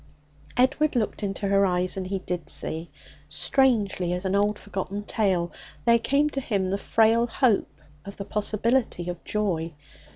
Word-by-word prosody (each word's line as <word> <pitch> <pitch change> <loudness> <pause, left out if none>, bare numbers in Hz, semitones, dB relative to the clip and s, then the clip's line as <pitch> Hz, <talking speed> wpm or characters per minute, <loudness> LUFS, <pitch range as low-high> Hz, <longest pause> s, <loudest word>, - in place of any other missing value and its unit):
Edward 285 +4 +3
looked 225 -2 -1
into 200 0 -2
her 200 0 +4
eyes, 180 -1 +1
and 190 -1 -4
he 195 +1 -1
did 180 -2 -5
see. 160 +1 -3 0.4
Strangely 205 - +1
as 180 +2 -3
an 190 - 0
old 205 +1 +2
forgotten 200 0 -5
tale, 190 -6 0 0.3
there 235 0 +5
came 280 +5 +2
to 275 - -2
him 195 -6 -1
the 195 - +1
frail 225 +2 +3
hope 235 -2 +1 0.2
of 200 - -9
the 200 - -5
possibility 215 -2 0
of 175 -1 -6
joy. 170 -7 -1
200 Hz, 160 wpm, -26 LUFS, 185-230 Hz, 0.4 s, there